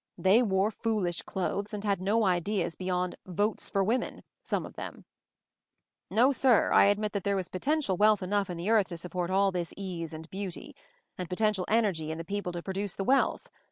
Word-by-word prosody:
j - - -12
They 195 +5 +6
wore 200 -2 +2
foolish 210 -6 -1
clothes 200 +3 -3
and 205 - -6
had 200 -3 0
no 210 +3 +2
ideas/ 180 -1 0
beyond 180 -1 -2
'Votes 205 +4 -1
for 195 - +1
Women' 235 +5 -1
— - - -58
some - - 0
of - - -10
themi. - - -8 1.1
"No 245 +4 +4
sirl 260 -4 +3
I - - +7
admit 205 +1 +2
that 200 -3 -3
there 200 0 +1
was 185 -2 -2
potential 265 - 0
wealth 210 -1 +4
enough 200 +1 0
in 175 - -4
the 180 +6 -1
earth 215 -4 +4
to 170 - -6
support 175 +1 -4
all 195 +1 +3
this 175 -2 -4
ease 175 -5 -5
and 160 0 -8
beauty; 190 -2 -6 0.4
and 180 - -4
potential 195 0 +1
energy 200 -9 +1
in 160 - -3
the 165 - -6
people 200 -2 -3
to 170 0 -5
produce 195 0 -3
the 195 - -2
wealth. 270 +7 +1
195 Hz, 205 wpm, -29 LUFS, 180-210 Hz, 1.1 s, I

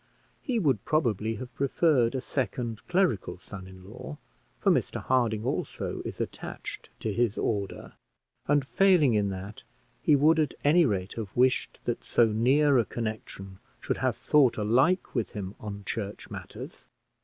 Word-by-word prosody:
He 250 -3 -1
would 135 - +1
probably 115 -8 0
have 125 +3 -8
preferred 135 -3 +2
a 130 - -1
second 120 -3 -3
clerical 180 - +1
son 95 0 -10
in 95 0 -13
law, 100 - -8 0.4
for - - +3
Mr - - 0
Harding, 115 -4 +1
also, 130 - -3
is - - -6
attached - - -6
to 110 - -1
his 115 0 +1
order; 100 -3 -2 0.5
and, 145 -1 +3
failing 175 -6 +4
in 105 -2 +2
that, 95 +2 -7 0.4
he 150 - +5
would 155 +3 +4
at 155 - 0
any 160 +2 +5
rate 95 -4 -2
have 110 -2 -6
wished 125 +1 +2
that - - -2
so 120 - +4
near 130 +6 +3
a 115 - +2
connection 105 -4 -6 0.2
should - - -2
have - - 0
thought 140 -5 +3
alike 130 - +2
with 115 -8 -2
him 100 -2 -5
on 100 -1 -7
church 105 -2 -5
matters. - - -9
115 Hz, 155 wpm, -28 LUFS, 105-145 Hz, 0.5 s, he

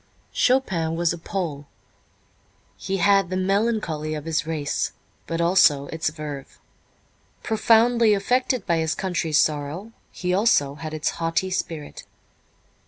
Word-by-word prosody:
Chopin 185 -11 +1
was 170 0 +1
a - - -6
Pole. 160 -6 -4 1.1
He 195 0 -3
had 195 0 +3
the 185 - -2
melancholy 185 -6 0
of 150 0 -6
his 165 0 -1
race, 150 -3 -2 0.3
but 165 0 -3
also 170 -5 +4
its 160 -1 -1
verve. 150 -3 -8 0.9
Profoundly 225 0 +4
affected 250 +5 0
by 170 -3 +1
his 160 0 0
country's 170 -5 -1
sorrow, 155 +8 0 0.2
he 180 0 -2
also 185 -9 +3
had 155 +1 -6
its 155 - -1
haughty 165 +3 0
spirit. 160 -5 -4
170 Hz, 125 wpm, -23 LUFS, 155-200 Hz, 1.1 s, also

